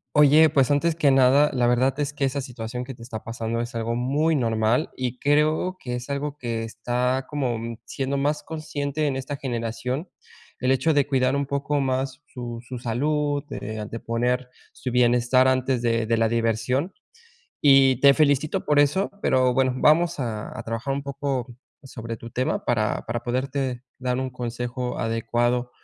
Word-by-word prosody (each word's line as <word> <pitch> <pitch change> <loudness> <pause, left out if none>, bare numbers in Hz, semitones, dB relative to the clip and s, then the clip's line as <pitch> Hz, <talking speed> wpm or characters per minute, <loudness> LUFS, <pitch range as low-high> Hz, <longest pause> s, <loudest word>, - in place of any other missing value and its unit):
Oye, 150 +2 +7
pues 135 -2 +3
antes 160 +3 +2
que 155 -3 +3
nada, 135 +2 +5
la 125 -1 +2
verdad 130 +3 +2
es 145 -1 -1
que 140 -1 0
esa 135 +1 -2
situación 125 0 -6
que 135 - -7
te 120 - -15
está 115 -2 -7
pasando 115 0 -3
es 120 +2 -7
algo 115 0 -2
muy 145 +6 +1
normal, 115 -2 +1
y 125 -1 -3
creo 155 +6 +1
que 125 -1 -4
es 125 +3 -6
algo 140 +1 -3
que 115 -4 -3
está 125 +3 -1
como 120 -6 -2
siendo 135 +1 -2
más 145 +2 0
consciente 155 -2 -3
en 135 -2 -1
esta 135 +2 -4
generación. 125 +5 -3 0.5
El 130 +1 +1
hecho 135 +5 +3
de 145 -2 +3
cuidar 130 -2 +1
un 140 0 0
poco 140 +1 -1
más 135 +1 -1
su 120 -2 -7
su 125 +1 -8
salud, 145 +5 0
de 110 -4 -5
de 115 - -5
poner 125 +2 -1 0.2
su 130 - -5
bienestar 125 +1 +4
antes 130 -1 +1
de 115 -1 +1
de 115 +1 +1
la 115 0 +3
diversión, 115 - 0 0.7
y 135 -3 +5
te 140 0 +7
felicito 150 0 +2
por 150 - +2
eso. 150 +7 +2
Pero 130 -1 +3
bueno, 130 0 +2
vamos 165 +4 +3
a 110 -3 -4
a - - -4
trabajar 115 +4 -3
un 140 - -3
poco 135 -3 -3 0.3
sobre 115 -4 -7
tu 115 +2 -10
tema, 130 +2 -1
para 110 -3 0
para 120 0 -2
poderte 130 0 -2 0.2
dar 125 -1 -1
un 130 0 -2
consejo 125 0 -4
adecuado. 120 +2 0
130 Hz, 175 wpm, -24 LUFS, 120-140 Hz, 0.7 s, Oye